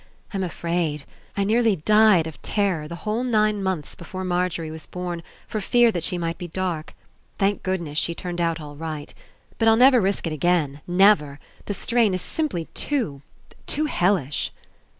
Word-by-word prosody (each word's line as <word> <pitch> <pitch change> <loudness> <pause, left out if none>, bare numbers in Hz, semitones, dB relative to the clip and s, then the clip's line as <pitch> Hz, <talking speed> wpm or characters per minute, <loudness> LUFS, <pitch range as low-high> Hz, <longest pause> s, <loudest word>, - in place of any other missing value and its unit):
I'm 195 -1 -1
afraid. 170 -4 -2 0.3
I 200 - +2
nearly 220 +1 +3
died 210 0 +5
of 160 -2 -8
terror 190 -7 0
the 170 +2 -9
whole 215 +3 0
nine 215 -4 +2
months 190 -6 -2
before 185 +2 -7
Margery 175 -3 -1
was 160 0 -9
born 180 -1 -4 0.3
for 215 - -3
fear 240 +3 +4
that 175 -6 -3
she 180 - 0
might 165 0 -3
be 175 - -5
dark. 175 -3 -3 0.4
Thank 200 +1 +1
goodness, 170 -5 -1
she 170 - -1
turned 175 0 -4
out 165 -1 0
all 145 -1 -9
right. 155 -1 -6 0.5
But 225 - +3
I'll 225 - +7
never 255 0 +7
risk 195 0 0
It 165 - -2
again. 155 -3 +1
Never! 175 -6 +4 0.3
The 205 - -3
strain 225 -1 +2
Is 185 - -3
simply 290 - -2
too 225 - -1 0.2
— - - -26
too 305 +2 +1
hellish." 180 - +1
180 Hz, 175 wpm, -24 LUFS, 165-210 Hz, 0.5 s, I'll